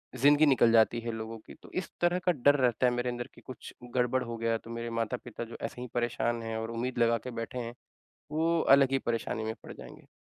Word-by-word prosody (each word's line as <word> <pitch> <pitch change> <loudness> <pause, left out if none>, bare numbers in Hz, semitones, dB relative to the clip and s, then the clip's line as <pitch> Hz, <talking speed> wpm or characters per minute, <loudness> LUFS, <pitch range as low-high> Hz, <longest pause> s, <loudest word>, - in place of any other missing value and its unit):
ज़िंदगी 145 +4 +5
निकल 130 -5 +5
जाती 115 +1 +4
है 115 0 -3
लोगों 110 0 -6
की। - - -10
तो - - -14
इस 185 - -2
तरह 175 +1 +3
का 180 - +5
डर 145 +2 +4
रहता 125 -1 +2
है - - +3
मेरे 120 0 -1
अंदर 120 0 -4
की - - -15
कुछ 130 - -10 0.2
गड़बड़ 125 +1 +2
हो 115 -1 -5
गया 115 0 0
तो 115 - -14
मेरे 115 0 -4
माता-पिता 120 0 -4
जो 115 - -9
ऐसे 115 +2 -5
ही 125 - -5
परेशान 120 -1 0
है 115 0 -3
और 110 +1 -4
उम्मीद 120 +2 -3
लगा 115 0 +4
के - - -4
बैठे 120 +2 -5
हैं 120 -1 -5 0.6
वो 165 +2 +2 0.2
अलग 135 -1 +4
ही 135 - +3
परेशानी 115 -2 -2
में 110 0 -2
पड़ - - -8
जाएँगे। - - -12
120 Hz, 240 wpm, -30 LUFS, 115-130 Hz, 0.6 s, ज़िंदगी